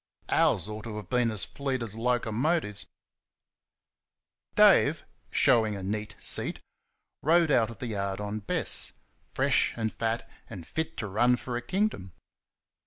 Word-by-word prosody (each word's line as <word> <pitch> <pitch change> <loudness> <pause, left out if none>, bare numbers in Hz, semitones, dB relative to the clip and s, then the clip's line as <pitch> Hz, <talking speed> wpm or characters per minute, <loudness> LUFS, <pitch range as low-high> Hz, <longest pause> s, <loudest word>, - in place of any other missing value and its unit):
OURS 90 +1 +3
ought 105 +1 -7
to 110 -2 -6
have 100 -4 -8
been 125 -2 +2
fleet 130 +4 -1
as 110 -2 -4
locomotives. 120 +1 0 1.7
Dave, - - +5 0.3
showing 115 -6 +3
a 95 - -6
neat 105 +2 -4
seat, - - 0 0.6
rode 165 +1 +4
out 115 -4 +3
of 115 - -9
the 130 - -5
yard 100 -1 -2
on 105 +1 -3
Bess, 100 - -1 0.4
fresh - - +2
and 110 -1 -2
fat 115 0 -2 0.2
and 85 -3 -8
fit 160 - -3
to 110 - -3
run 120 +5 +3
for 125 0 -5
a 120 - -2
kingdom. 150 - -2
115 Hz, 140 wpm, -28 LUFS, 105-125 Hz, 1.7 s, Dave